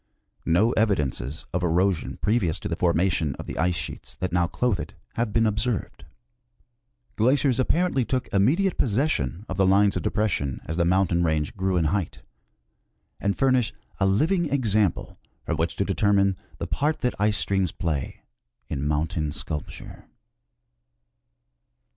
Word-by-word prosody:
No 95 +8 +4
evidences 75 - 0
of 90 - 0
erosion 90 +1 +1
previous 100 -7 +1
to - - -4
the 85 - -2
formation 85 -4 +1
of - - -8
the - - -6
ice 90 +1 +2
sheets - - -5
that 95 -2 -4
now 90 -1 +2
clothe 105 +2 0
it - - -7 0.2
have 115 -2 -1
been 115 +2 +2
observed. 110 - -2 1.1
Glaciers 130 +2 +3
apparently 155 0 +2
took 130 +1 -2
immediate 155 - +2
possession 105 - 0
of 95 - -5
the 95 -1 +4
lines 100 +1 +4
of 90 - -1
depression 85 -10 -1
as 80 - -3
the 85 0 +2
mountain 90 -1 +2
range 80 -2 0
grew 95 -2 0
in 85 - +2
height, 95 -5 -3 1.0
and 100 0 -1
furnish 130 -3 +2 0.3
a 95 - +3
living 160 - +2
example 110 - 0 0.2
from 80 - -2
which 80 +2 -1
to 100 - 0
determine 100 -1 +2 0.2
the, - - -4
part 150 +2 -1
that 125 - +1
ice 105 0 +2
streams 95 -1 0
play 75 -6 -3 0.5
in 70 - -3
mountain 75 +1 -1
sculpture. 75 +1 -7
95 Hz, 150 wpm, -25 LUFS, 85-115 Hz, 1.1 s, No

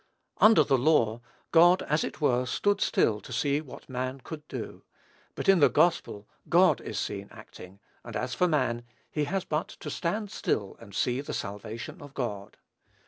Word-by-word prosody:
Under 215 -7 +7
the 135 -2 +2
law, 120 -6 +2 0.3
God 175 +2 +6
as 150 +1 0
it - - -5
were 125 -3 +2
stood 205 +9 +1
still 105 -2 +2
to - - -12
see 145 0 0
what 145 - -12
man 130 +1 -4
could 150 -2 -8
do; - - -7 0.5
but - - -4
in 195 -2 +6
the 145 - +6
gospel 150 -10 +1 0.2
God - - +5
is - - -6
seen - - -3
acting, 95 +2 -13 0.2
and - - -9
as 125 - -2
for 180 - +2
man, 125 -7 0 0.3
he 150 -1 0
has 190 +5 -2
but 155 +1 -1
to - - -8
"stand 205 +4 -2
still 100 -2 -2
and 100 -4 -13
see 125 +1 0
the 145 - -5
salvation 110 - -6
of 145 -1 -12
God." 105 -5 -4
140 Hz, 180 wpm, -28 LUFS, 115-160 Hz, 0.5 s, Under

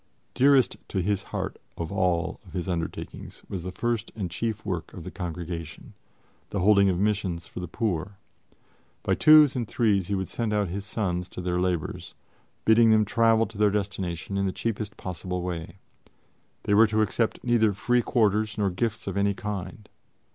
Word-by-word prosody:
Dearest 135 -1 +4
to 95 - -2
his 100 +2 0
heart - - -4 0.2
of 85 +2 -4
all 90 -4 0
his 90 0 -4
undertakings 85 -3 -5
was 95 - -4
the 90 +2 -5
first 115 +3 -2
and 95 -6 -4
chief 110 +3 -3
work 90 -5 -3
of 90 - -8
the 90 - -7
Congregation 85 -3 -6 0.6
the 100 - -2
holding 100 0 +5
of 90 - +1
missions 95 -4 0
for - - -8
the 90 - -5
poor. 100 -1 -2 0.9
By - - +1
twos 155 -3 +7
and 120 -3 -2
threes 100 -7 +1
he 100 - 0
would 95 -1 -2
send 115 -3 -2
out 105 -3 +1
his 100 +3 -4
sons 90 -5 -2
to - - -8
their 90 0 -1
labors, 90 -4 -2 0.5
bidding 115 +1 +6
them 110 -1 +5
travel 115 +1 +3
to 110 -2 -11
their 105 -1 +5
destination 100 -2 -3
in 100 0 +1
the - - 0
cheapest 105 0 -3
possible 90 0 -4
way. 85 -1 -5 0.9
They 105 - +1
were 110 +2 +7
to 110 +1 +2
accept 110 +2 -1
neither 115 -3 +3
free 120 +5 +1
quarters 110 -2 +1
nor 100 -2 +1
gifts 110 +4 -2
of 100 0 -3
any 100 0 +2
kind. 105 +1 -6
100 Hz, 175 wpm, -26 LUFS, 90-110 Hz, 0.9 s, twos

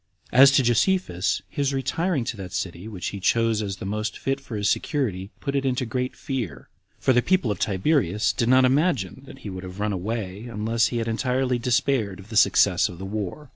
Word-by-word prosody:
2. - - -10
As 135 +1 +10
to 135 -1 +3
Josephus, 120 - +1
his 140 -1 -1
retiring 165 +2 0
to 120 0 -4
that 95 -3 -8
city 90 +1 -4
which 95 -6 -4
he 100 - -6
chose 115 +2 +2
as 100 -2 -3
the 95 - -8
most 105 +2 -3
fit 135 +1 -2
for 125 -4 -7
his 105 0 0
security, 100 - -1
put 140 -1 -3
it 140 - +1
into 130 -1 0
great 125 +2 -3
fear; 125 - -5 0.3
for 130 - +3
the 125 - +4
people 185 - +1
of 100 - -3
Tiberias 105 - +1
did 115 - 0
not 130 0 +6
imagine 135 - +1
that - - -11
he - - -3
would 95 0 -7
have 95 +1 -9
run 105 0 0
away, 100 +1 -4
unless 115 0 0
he 120 - -3
had 115 -1 -2
entirely 125 +2 0
despaired 120 -5 0
of 100 +2 -13
the 115 - -7
success 100 -2 +4
of 90 - -9
the 95 - -7
war. 105 +8 -5
115 Hz, 215 wpm, -24 LUFS, 100-130 Hz, 0.3 s, As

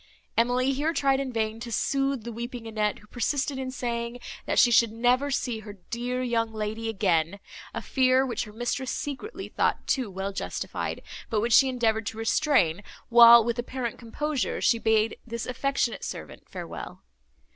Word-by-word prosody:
Emily 250 +3 +2
here 300 +5 0
tried 275 -3 +2
in 270 -2 -3
vain 220 -1 -2
to 235 0 -7
sooth 275 +1 0
the 235 - -6
weeping 235 +1 -6
Annette, 215 -2 -1
who - - -17
persisted 265 +4 -1
in 260 -1 -3
saying, 235 -1 -3 0.3
that - - 0
she 240 - +6
should 230 -1 +5
never 245 +5 +2
see 245 -4 -1
her 210 -1 -9 0.2
dear 245 +2 -2
young 230 -2 0
lady 220 +1 -3
again; 190 -3 +1 0.3
a - - -5
fear, 260 0 +3
which 245 -2 -2
her 210 - -11
mistress 240 +3 -3
secretly 290 - -5
thought - - 0
too 255 -6 0
well 195 +1 -4
justified, - - -4 0.3
but 220 - +1
which 230 +2 +1
she 270 +2 +7
endeavoured 225 -4 0
to 220 - -4
restrain, 225 - +2 0.3
while, 235 0 +9
with 235 +1 -2
apparent 240 -1 -4
composure, 275 +4 -2
she 230 -2 +3
bade 220 -1 +2
this 235 0 -4
affectionate 255 -1 -1
servant - - -8
farewell. - - -8
235 Hz, 170 wpm, -27 LUFS, 220-255 Hz, 0.3 s, while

